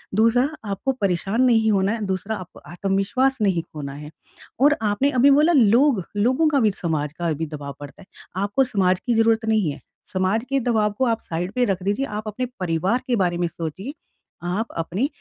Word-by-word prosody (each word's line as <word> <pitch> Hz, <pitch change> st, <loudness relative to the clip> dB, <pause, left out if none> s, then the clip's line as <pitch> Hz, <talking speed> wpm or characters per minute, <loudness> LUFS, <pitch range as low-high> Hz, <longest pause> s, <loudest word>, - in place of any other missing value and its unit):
दूसरा 230 Hz, +5 st, +4 dB, 0.2 s
आपको 200 Hz, +7 st, -1 dB
परेशान 195 Hz, +4 st, 0 dB
नहीं 225 Hz, -4 st, +4 dB
होना 195 Hz, 0 st, +2 dB
है, 225 Hz, -1 st, -3 dB
दूसरा 190 Hz, +3 st, -2 dB
आपको 185 Hz, -4 st, -10 dB
आत्मविश्वास 195 Hz, +9 st, 0 dB
नहीं 190 Hz, -5 st, +2 dB
खोना 140 Hz, -2 st, -6 dB
है 150 Hz, +2 st, -9 dB, 0.5 s
और 290 Hz, +2 st, +5 dB
आपने 215 Hz, +7 st, +1 dB
अभी 275 Hz, -, +6 dB
बोला 305 Hz, +5 st, +5 dB
लोग 240 Hz, -, +4 dB
लोगों 255 Hz, +9 st, +3 dB
का 280 Hz, -2 st, +2 dB
भी, 215 Hz, -3 st, +3 dB
समाज 155 Hz, -6 st, -3 dB
का 170 Hz, 0 st, -2 dB
भी 160 Hz, +2 st, -3 dB
दबाव 145 Hz, -2 st, -7 dB
पड़ता 145 Hz, +5 st, -11 dB
है। 190 Hz, -, -14 dB, 0.4 s
आपको 205 Hz, +7 st, +2 dB
समाज 185 Hz, -7 st, +1 dB
की 245 Hz, -, +1 dB
ज़रूरत 225 Hz, 0 st, +2 dB
नहीं 215 Hz, -8 st, +1 dB
है, 140 Hz, -, -10 dB, 0.3 s
समाज 190 Hz, +5 st, +1 dB
के 275 Hz, 0 st, +1 dB
दबाव 220 Hz, -4 st, +1 dB
को 260 Hz, -, +2 dB
आप 230 Hz, -1 st, +1 dB
साइड 175 Hz, +3 st, -4 dB
पे 250 Hz, -1 st, +2 dB
रख 190 Hz, -4 st, -2 dB
दीजिए, 205 Hz, +8 st, 0 dB
आप 210 Hz, -1 st, -6 dB
अपने 235 Hz, +4 st, -3 dB
परिवार 185 Hz, +7 st, 0 dB
के 245 Hz, -, +2 dB
बारे 180 Hz, -5 st, +1 dB
में 175 Hz, -1 st, 0 dB
सोचिए, 170 Hz, -, -6 dB, 0.5 s
आप 195 Hz, +6 st, -2 dB
अपने 180 Hz, -, -1 dB
205 Hz, 195 wpm, -22 LUFS, 180-240 Hz, 0.5 s, अभी